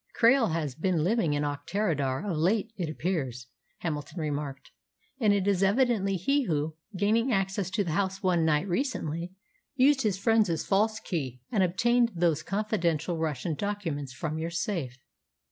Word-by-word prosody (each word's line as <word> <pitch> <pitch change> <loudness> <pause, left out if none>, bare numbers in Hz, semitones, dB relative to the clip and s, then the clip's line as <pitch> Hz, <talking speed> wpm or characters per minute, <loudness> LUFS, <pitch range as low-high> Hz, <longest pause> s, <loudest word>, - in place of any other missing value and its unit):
"Krail 235 -4 +5
has 155 -4 -2
been 165 +1 0
living 185 -5 +2
in 145 - 0
Auchterarder 145 0 -1
of 180 - -1
late, 200 +7 +1
it 175 -6 -3
appears," 150 -7 -2 0.4
Hamilton 155 +1 -4
remarked, 145 -3 -4 0.5
"and 215 -5 +4
it 200 -2 +2
is 195 -2 +2
evidently 200 -1 +2
he 275 - +1
who, 155 -3 -1 0.2
gaining 225 +6 +2
access 195 -2 0
to 195 +2 0
the 170 - -3
house 195 +3 -1
one 175 -3 +3
night 155 +3 +2
recently, 175 - -2 0.4
used 270 +1 +4
his 210 -6 +1
friend's 205 -5 +2
false 215 +2 +2
key, 135 - -4
and 210 - +2
obtained 235 +6 +2
those 165 -3 +2
confidential 175 -5 -1
Russian 155 0 -1
documents 165 -7 -3
from 155 +3 -4
your 165 +1 -2
safe." 170 - -3
180 Hz, 155 wpm, -28 LUFS, 155-210 Hz, 0.5 s, Krail